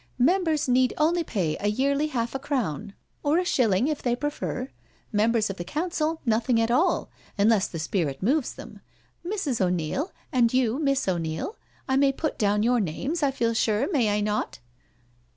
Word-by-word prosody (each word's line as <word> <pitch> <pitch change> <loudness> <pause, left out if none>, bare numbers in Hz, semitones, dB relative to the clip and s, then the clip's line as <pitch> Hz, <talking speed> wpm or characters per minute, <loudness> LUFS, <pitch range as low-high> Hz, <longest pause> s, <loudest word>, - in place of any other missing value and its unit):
" 120 - -38
Members 320 +1 +2
need 255 0 +3
only 330 +3 +2
pay 180 - -1
a 205 - -1
yearly 280 +7 +1
half 235 -6 -2
a 270 - -2
crown, 220 - -3 0.3
or 295 +3 +2
a 360 - +1
shilling, 230 - +2
if 305 -2 -2
they 240 -1 +1
prefer 290 -1 -3
it. 260 - -6 0.4
Members 215 -1 +2
of 195 - -9
the 175 - -4
council 320 - -2
nothing 230 +1 +2
at 225 +1 +1
all, 315 +10 +2 0.3
unless 205 -1 +3
the 165 - -7
spirit 160 -2 -2
moves 275 +5 +1
them. - - -11 0.4
Mrs. 345 - -2
O'Neil 180 - -1 0.2
and 240 -3 +3
you. 255 0 +1
Miss 275 -5 +1
O'Neil, 170 - -2 0.3
I 265 -1 +2
may 275 0 +4
put 295 +2 -3
down 210 -1 +2
your 245 +1 +3
names, 260 - -2
I 285 - +3
feel 235 -4 0
sure, 225 - +1
may 250 - +2
I 205 0 +1
not? 210 0 -1
245 Hz, 185 wpm, -26 LUFS, 210-290 Hz, 0.4 s, may